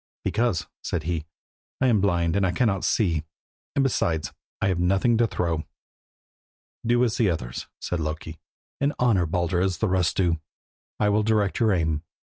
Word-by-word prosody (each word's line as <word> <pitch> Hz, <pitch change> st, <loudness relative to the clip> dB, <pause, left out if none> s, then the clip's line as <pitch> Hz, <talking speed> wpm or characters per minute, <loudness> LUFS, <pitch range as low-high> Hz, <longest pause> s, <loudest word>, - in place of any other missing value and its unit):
"Because," 115 Hz, -6 st, +1 dB, 0.2 s
said 85 Hz, -, -2 dB
he, 80 Hz, -2 st, -2 dB, 0.5 s
"I 130 Hz, -, +2 dB
am 115 Hz, -6 st, +4 dB
blind 85 Hz, -4 st, +1 dB
and 100 Hz, -, +2 dB
cannot 100 Hz, -5 st, +1 dB
see 100 Hz, -6 st, +2 dB
him, 80 Hz, -1 st, -1 dB, 0.5 s
and 140 Hz, -, +3 dB
besides 85 Hz, -, 0 dB, 0.3 s
I -, -, +1 dB
have 90 Hz, -2 st, 0 dB
nothing 95 Hz, +7 st, +3 dB
to 120 Hz, -, +4 dB
throw." 85 Hz, -5 st, -1 dB, 1.2 s
"Do 120 Hz, +1 st, +3 dB
as 120 Hz, -3 st, +1 dB
the 110 Hz, -5 st, +3 dB
others," 60 Hz, -8 st, -4 dB
said 90 Hz, -, -2 dB
Loki, 80 Hz, +1 st, -4 dB, 0.4 s
"and 140 Hz, +1 st, +1 dB
honour 105 Hz, -9 st, +3 dB
Baldur 85 Hz, +2 st, 0 dB
as 95 Hz, -1 st, +1 dB
the 110 Hz, -, 0 dB
rest 90 Hz, -3 st, +1 dB
do. 85 Hz, -4 st, +2 dB, 0.6 s
I 105 Hz, -, +3 dB
will 105 Hz, +1 st, +3 dB
direct 105 Hz, -2 st, +1 dB
your 110 Hz, -2 st, +4 dB
aim. 80 Hz, -4 st, +1 dB
95 Hz, 170 wpm, -25 LUFS, 85-110 Hz, 1.2 s, am